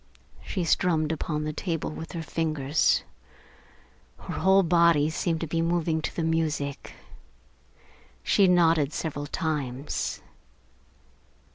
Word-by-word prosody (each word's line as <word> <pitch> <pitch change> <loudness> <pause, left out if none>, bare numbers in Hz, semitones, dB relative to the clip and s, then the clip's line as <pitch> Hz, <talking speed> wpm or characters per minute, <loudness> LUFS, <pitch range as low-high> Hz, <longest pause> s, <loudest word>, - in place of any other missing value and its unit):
She 185 - -3
strummed 160 -2 +1
upon 150 -1 -2
the 155 0 -3
table 165 -1 -3
with 160 +1 -8
her 165 -2 -4
fingers. 155 -2 +1 1.1
Her - - -7
whole 190 +1 +5
body 170 -3 +4
seemed 165 0 -1
to - - -1
be 165 +2 -1
moving 165 -1 0
to - - -4
the 165 - -1
music. 155 -3 -2 1.3
She 195 - +4
nodded 165 -5 +3
several 145 -2 -4
times. 145 -4 -3
160 Hz, 115 wpm, -26 LUFS, 150-170 Hz, 1.3 s, whole